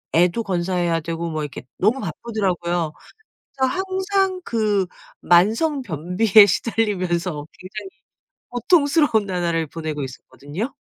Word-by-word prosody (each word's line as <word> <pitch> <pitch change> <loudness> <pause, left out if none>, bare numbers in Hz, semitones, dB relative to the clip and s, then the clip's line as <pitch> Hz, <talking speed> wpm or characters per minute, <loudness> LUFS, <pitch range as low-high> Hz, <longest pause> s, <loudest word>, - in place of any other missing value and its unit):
애도 180 +6 +3
건사해야 175 -3 0
되고 165 +1 -3
뭐 155 -1 -2
이렇게 145 -4 -7
너무 215 +8 +2
바쁘더라고요. 175 - -2 0.6
그래서 265 -1 +1
항상 380 0 0
그 210 - +1 0.4
만성 225 - +3
변비에 190 - +5
시달리면서 180 -7 -1
굉장히 195 +2 -8 0.6
고통스러운 285 - +3
나날을 170 -3 -1
보내고 155 -1 -5
있었거든요. 145 - -6
190 Hz, 305 characters per minute, -22 LUFS, 170-230 Hz, 0.6 s, 변비에